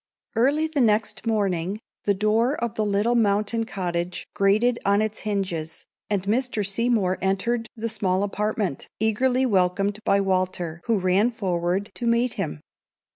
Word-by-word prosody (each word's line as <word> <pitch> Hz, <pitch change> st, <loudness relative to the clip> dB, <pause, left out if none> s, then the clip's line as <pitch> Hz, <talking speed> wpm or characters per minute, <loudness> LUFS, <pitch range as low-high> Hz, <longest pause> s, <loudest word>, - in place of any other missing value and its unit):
_ -, -, -69 dB, 0.3 s
Early 280 Hz, +7 st, +3 dB
the 310 Hz, -3 st, 0 dB
next 220 Hz, 0 st, +1 dB
morning 195 Hz, -3 st, 0 dB, 0.3 s
the 200 Hz, -, +3 dB
door 220 Hz, +7 st, +2 dB
of 235 Hz, -4 st, -3 dB
the 220 Hz, -, -1 dB
little 205 Hz, +3 st, +1 dB
mountain 215 Hz, 0 st, +1 dB
cottage 175 Hz, -3 st, -3 dB
grated 215 Hz, +4 st, +2 dB
on 200 Hz, +1 st, +3 dB
its 215 Hz, 0 st, -1 dB
hinges, 180 Hz, -6 st, -3 dB, 0.2 s
and 200 Hz, -3 st, 0 dB
Mr. 220 Hz, 0 st, 0 dB
Seymour 200 Hz, -3 st, +1 dB
entered 225 Hz, +5 st, 0 dB
the 230 Hz, 0 st, -3 dB
small 195 Hz, -3 st, 0 dB
apartment, 205 Hz, -5 st, -2 dB
eagerly 250 Hz, +4 st, +2 dB
welcomed 195 Hz, -1 st, +1 dB
by 200 Hz, -, +3 dB
Walter, 185 Hz, -3 st, -1 dB
who 230 Hz, -2 st, +3 dB
ran 190 Hz, +4 st, +3 dB
forward 190 Hz, -2 st, -1 dB
to 240 Hz, -, -3 dB
meet 235 Hz, +1 st, +2 dB
him. 75 Hz, -, -4 dB
205 Hz, 150 wpm, -24 LUFS, 190-230 Hz, 0.3 s, Early